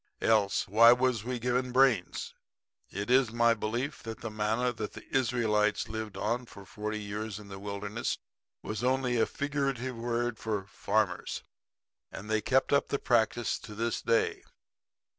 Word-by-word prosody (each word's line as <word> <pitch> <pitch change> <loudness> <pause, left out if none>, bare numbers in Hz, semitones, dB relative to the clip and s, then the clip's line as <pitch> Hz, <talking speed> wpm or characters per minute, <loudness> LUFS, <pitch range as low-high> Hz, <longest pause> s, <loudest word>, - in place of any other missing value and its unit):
Else 105 -3 +3
why 115 +4 +8
was 125 -3 +1
we 125 +1 -2
given 125 +1 0
brains? 125 -8 +2 0.6
It 100 +4 -3
is 130 -3 +4
my 115 0 +4
belief 120 +6 -3
that 115 -1 -7
the 115 - -5
manna 110 +4 0
that 110 -2 -5
the - - -10
Israelites 115 -5 +2
lived 110 -3 -5
on 120 +5 -1
for 100 -3 -12
forty 105 +2 -4
years 105 0 -4
in 105 -1 -11
the 95 0 -8
wilderness 100 +2 -3 0.5
was 110 +2 -4
only 130 -1 +1
a - - +3
figurative 135 -3 -2
word 120 0 -2
for 105 -4 -2
farmers; 100 -1 -1 0.7
and 105 +3 -7
they 110 0 +2
kept 130 +5 +2
up 140 - +3
the 140 - 0
practice 120 -2 +1
to 105 - -10
this 115 +2 -1
day. 115 - +1
115 Hz, 160 wpm, -30 LUFS, 105-125 Hz, 0.7 s, why